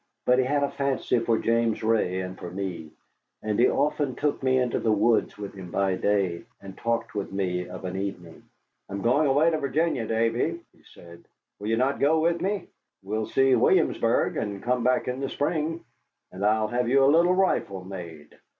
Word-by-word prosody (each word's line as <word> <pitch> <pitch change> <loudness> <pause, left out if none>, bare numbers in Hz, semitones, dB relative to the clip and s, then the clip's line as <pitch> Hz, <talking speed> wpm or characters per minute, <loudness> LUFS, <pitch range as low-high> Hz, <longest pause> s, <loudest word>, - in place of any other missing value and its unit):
But 125 +1 +4
he 130 - +2
had 140 +2 +1
a 140 - -1
fancy 140 -3 0
for 115 0 +1
James 115 -1 0
Ray 105 -5 +1
and 90 0 -6
for 90 - -8
me, 90 -4 -5 0.5
and 105 0 -1
he 125 - +5
often 145 -2 0
took 145 -1 -1
me 130 -1 +2
into 125 -2 0
the 110 - +1
woods 110 +2 +2
with 100 -1 -7
him 95 -3 -9
by 95 +1 0
day, 95 -1 0
and 95 -1 -11
talked 115 +1 -2
with 100 -1 -4
me 90 -2 -2
of 90 +1 -8
an 90 0 -4
evening. 95 -4 -6 0.5
"I'm 100 0 -5
going 140 +6 +3
away 145 +5 +3
to 155 - -1
Virginia, 140 -4 0
Davy," 115 +9 0 0.2
he - - -26
said; 85 0 -14 0.3
"will 105 - -6
you 115 +1 +1
not 130 +3 +1
go 155 +3 +3
with 170 +1 +1
me? 200 +1 -1 0.4
We'll 105 +2 -3
see 135 +3 +3
Williamsburg, - - +2
and 100 -1 -4
come 125 0 0
back 125 +1 +1
in 125 +1 -3
the 135 -1 -3
spring, 160 +3 -2 0.5
and 95 +2 -7
I'll 110 +1 +2
have 120 0 0
you 135 +1 +4
a - - +6
little 175 +3 +4
rifle 100 - 0
made." 85 -6 -10
115 Hz, 195 wpm, -26 LUFS, 95-135 Hz, 0.5 s, a